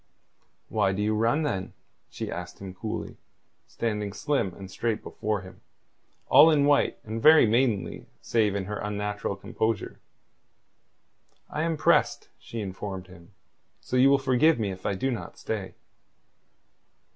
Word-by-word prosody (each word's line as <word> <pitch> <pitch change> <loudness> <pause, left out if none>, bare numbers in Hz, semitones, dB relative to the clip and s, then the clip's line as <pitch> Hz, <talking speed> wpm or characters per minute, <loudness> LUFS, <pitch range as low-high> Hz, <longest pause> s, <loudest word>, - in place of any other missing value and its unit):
"Why 95 - +1
do 100 - -2
you 105 +1 +1
run, 115 +8 +2
then?" 95 -11 -3 0.4
she - - -5
asked 90 0 -6
him 95 -1 -8
coolly, 105 +4 -5 0.5
standing 105 -3 -3
slim 135 -4 0
and 95 -1 -10
straight 115 0 -2
before 105 -2 -3
him, 95 0 -13 0.7
all 155 +3 +8
in 145 -3 +4
white 145 0 +3
and 110 +1 -5
very 155 +3 +8
maidenly 115 -2 0
save 105 -4 +1
in 100 -1 -2
her 105 +2 -4
unnatural 105 -1 -3
composure. 110 +2 -3 1.5
"I 150 - -2
am 165 -1 0
pressed," - - +2
she 115 - -6
informed 95 -1 -6
him. 90 +2 -16 0.4
"So - - -5
you 130 +2 +6
will 140 - +5
forgive 135 +4 +3
me 105 -3 -1
if 95 +1 -6
I 100 - 0
do 130 +7 -1
not 100 -8 -6
stay." 100 -4 -5
105 Hz, 145 wpm, -27 LUFS, 95-125 Hz, 1.5 s, all